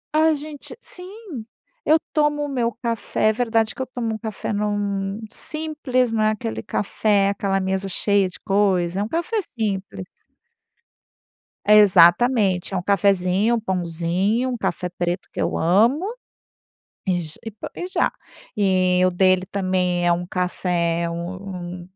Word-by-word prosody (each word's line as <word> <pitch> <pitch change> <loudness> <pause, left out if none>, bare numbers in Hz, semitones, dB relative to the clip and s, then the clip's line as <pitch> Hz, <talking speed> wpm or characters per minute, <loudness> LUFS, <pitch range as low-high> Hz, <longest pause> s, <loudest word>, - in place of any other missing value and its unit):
A 315 0 +4
gente 295 0 -9
sim, 365 - -8 0.4
eu 310 - +5 0.2
tomo 295 -1 +2
o - - -2
meu 245 -4 0
café 230 -2 0
é 220 - +2
verdade 225 -2 +1
que - - -7
eu - - -1
tomo 240 -3 -3
um - - -3
café 220 -1 -4
num 205 -1 -1
Simples. 300 -7 -1
Não 225 -1 0
é 215 - +4
aquele 115 - -3
café, 200 - +1
aquela 195 -1 0
mesa 190 +1 -1
cheia 200 0 +2
de 180 - -13
coisa. 195 -3 +1
É - - +1
um - - -3
café 340 - -2 0.2
simples. 195 - -3 1.6
É 210 +1 +7
exatamente. 195 +1 +5
É 190 - 0
um - - -1
cafezinho, 200 +3 +2
um - - 0
pãozinho, 185 +5 0
um 245 - -2
café 180 -3 -2
preto 175 +1 -3
que - - -4
eu - - 0
amo. 225 - +3 1.0
E 180 -2 +1
j 160 -2 -7
e 225 - -4
po 210 - -8
e 355 - -5
já. 370 - +1 0.5
E 185 -2 +3
o 185 - +4
dele 185 0 +3
também 180 -2 0
é 175 - +5
um 175 +1 -2
café 175 -2 -1
é 170 - -1
um 180 +1 -6
200 Hz, 160 wpm, -22 LUFS, 180-230 Hz, 1.6 s, É